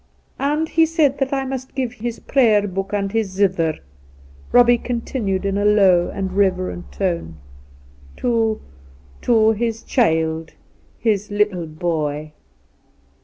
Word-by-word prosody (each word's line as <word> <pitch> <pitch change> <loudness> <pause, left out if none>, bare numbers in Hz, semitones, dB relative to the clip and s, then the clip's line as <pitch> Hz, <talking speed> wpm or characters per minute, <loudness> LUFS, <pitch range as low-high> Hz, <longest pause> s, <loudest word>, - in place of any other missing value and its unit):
And 300 +3 0
he 325 0 +3
said 305 -4 +1
that 270 -1 0
I 270 -1 -1
must 260 0 -6
give 255 -3 -2
his 235 -1 -5
Prayer 220 -7 +3
Book 195 +1 -4
and 200 -1 -1
his 220 -2 0
zither 185 -5 +1 0.4
' 70 0 -24
(Eobbie 245 -1 +5
continued 230 -5 -2
in 200 0 0
a - - 0
lower 195 -4 +4
and 190 -1 -4
reverent 185 -2 0
tone) 170 - -3 0.4
' 70 0 -24
to 225 -3 0 0.3
— 65 0 -26
^to 220 -2 +3
his 225 0 -2
child 160 -7 0 0.2
— - - -35
his 210 -1 +1
little 205 -5 0
boy.' 155 -2 -3
200 Hz, 145 wpm, -20 LUFS, 170-235 Hz, 0.4 s, Eobbie